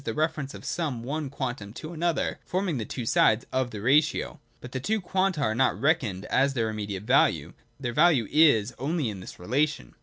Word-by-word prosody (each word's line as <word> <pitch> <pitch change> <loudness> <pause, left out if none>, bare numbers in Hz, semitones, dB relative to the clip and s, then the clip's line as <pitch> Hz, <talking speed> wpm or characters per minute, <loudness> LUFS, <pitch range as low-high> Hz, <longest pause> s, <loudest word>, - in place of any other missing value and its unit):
the - - -3
reference 155 -3 -1
of - - -11
some 145 -9 -2
one 145 +3 -3
quantum 125 -7 -5
to 155 +6 -8
another, 170 0 -1
forming 180 -6 -1
the 110 - -3
two 120 +1 -5
sides 110 0 +3
of 130 -1 0
the 105 - -7
ratio. 145 +8 +2 0.2
But 125 - -10
the 130 - -3
two 215 - 0
quanta 185 -3 0
are 110 -6 +1
not 130 +3 +1
reckoned 130 - 0
at 135 +1 +1
their 115 -3 0
immediate 105 -2 -5
value: 95 - +2 0.3
their 120 -3 -3
value 150 -7 +4
is 125 -8 +4
only 145 -1 -1
in 100 -3 -6
this 90 - -10
relation. 125 - -1
130 Hz, 195 wpm, -27 LUFS, 110-155 Hz, 0.3 s, value